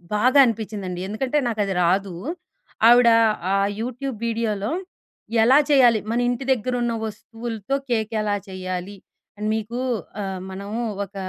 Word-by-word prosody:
బాగా 255 +6 +3
అనిపిచిందండి. 210 -6 -3
ఎందుకంటే 255 +8 -1
నాకది 210 -4 -1
రాదు. 190 +2 +1 0.7
ఆవిడ 240 0 +7 0.4
ఆ - - +3 0.3
యూట్యూబ్ 250 +1 -4
వీడియోలో, 220 -3 -1 0.7
ఎలా 255 +4 +6
చేయాలి, 245 -6 +5
మన 235 - +1
ఇంటి 245 +2 -2
దగ్గరున్న 240 0 -1
వస్తువులతో 225 +2 -5
కేకెలా 220 -2 0
చెయ్యాలి, 185 +1 -5 0.4
అని 210 - -3
మీకు 220 +3 -4 0.4
ఆహ్, 190 -1 -4
మనము 200 +5 -5 0.2
ఒక 200 - -23
220 Hz, 115 wpm, -23 LUFS, 200-240 Hz, 0.7 s, ఆవిడ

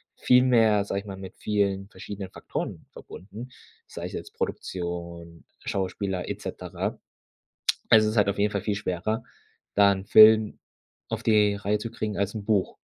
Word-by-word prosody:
viel 125 0 +4
mehr, 110 -5 +4
sage 100 - -2
ich - - -19
mal, 95 -1 -7
mit 95 -1 -10
vielen 100 -2 -1
verschiedenen 100 0 -8
Faktoren - - -6
verbunden, 105 +7 -10 0.4
sei - - -7
es - - -7
jetzt - - -7
Produktion, 85 -2 -5 0.2
Schauspieler 95 -1 -2
et - - -5
cetera. - - -5 0.9
Also, 110 -1 +7
es 110 - 0
ist - - -5
halt 100 - +4
auf 100 - -1
jeden 105 0 +1
Fall 100 -2 -2
viel 105 -1 -1
schwerer, 105 +2 -2 0.5
da 100 -1 +6
'n 95 0 -4
Film 110 0 +7 0.5
auf - - -4
die 105 -2 +4
Reihe 105 +1 -1
zu 115 +1 -6
kriegen 105 -3 -4
als 100 +2 -1
'n 105 -2 -5
Buch. 105 -3 +1
100 Hz, 170 wpm, -26 LUFS, 95-110 Hz, 0.9 s, Also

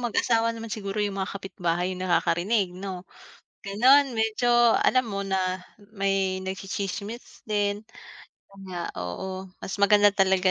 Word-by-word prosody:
mag-asawa 230 -1 +1
naman 225 -1 -7
siguro, 200 -1 -3
yung 200 -1 -3
mga 190 - -3
kapitbahay 180 -2 -2
yung 185 0 -5
nakakarinig, 185 +2 +1
'no? 185 0 -6 0.6
Gano'n, 255 +7 +5
medyo, 225 +2 +1 0.3
alam 255 -1 +3
mo 200 -1 -3
na 185 -1 0 0.4
may 195 -2 0
nagtsitsismis 195 +4 -5
din. 205 0 0 0.7
'Yon 195 0 -15
nga, 175 -2 -4 0.2
oo, 185 - -5 0.2
mas 195 - -5
maganda 205 +1 +6
talaga, 190 -1 +3
195 Hz, 130 wpm, -26 LUFS, 185-215 Hz, 0.7 s, maganda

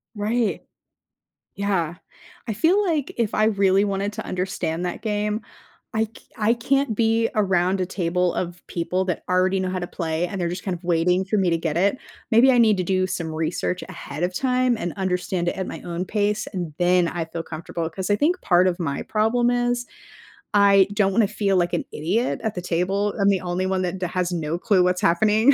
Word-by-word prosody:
Right. 215 +1 0 0.9
Yeah. 190 -5 -1 0.5
I 220 - -1
feel 355 - +3
like 305 -5 -1
if 230 -3 0
I 215 - +3
really 195 -2 +3
wanted 200 0 -1
to 220 - -6
understand 180 -2 -2
that 175 - -4
game, 210 0 -1 0.5
I 220 0 +2
c - - -17 0.3
I 220 +1 +3
can't 270 0 0
be 225 +1 +2
around 190 -2 +2
a - - +1
table 180 -1 0
of 175 -1 -4
people 180 +2 -1
that 180 -3 -2
already 185 +1 +2
know 185 0 -1
how 185 - -2
to 175 - -3
play 165 -1 -2
and 190 +1 -4
they're 170 - 0
just 180 +1 -5
kind 190 -3 -2
of 170 - -12
waiting 180 +2 +2
for 210 +2 0
me 185 -3 +2
to 165 - +2
get 160 -1 -2
it. 200 +8 +2 0.3
Maybe 240 +4 +6
I 250 - +3
need 220 -4 +5
to 185 - 0
do 185 +1 +1
some 175 -3 -3
research 160 +3 -2
ahead 170 -4 -6
of 180 +1 0
time 255 +2 +1
and 175 -5 -3
understand 180 -2 -1
it - - -4
at 190 - -3
my - - -7
own 175 +1 -3
pace, 210 +1 0
and 175 -5 -4
then 180 0 +3
I 170 -2 -3
feel 165 0 -6
comfortable. 165 +1 -5
'Cause 185 +3 -5
I 205 - +4
think 330 - +1
part 180 0 +4
of 180 -1 -1
my 160 -5 -2
problem 235 +3 +1
is 245 0 0 0.7
I 200 -1 +5
don't 200 -1 +2
wanna 215 0 +3
feel 200 -2 0
like 175 -1 +1
an - - -1
idiot 195 +11 -1
at 220 - -1
the - - -2
table. 190 +4 0
I'm 200 - +4
the 195 -2 +1
only 180 0 -2
one 190 0 0
that 180 +1 -2
d 185 - 0
has 180 0 -1
no 165 -1 -2
clue 200 -2 +3
what's 180 0 +1
happening. 215 +9 +4
190 Hz, 215 wpm, -23 LUFS, 175-215 Hz, 0.9 s, Maybe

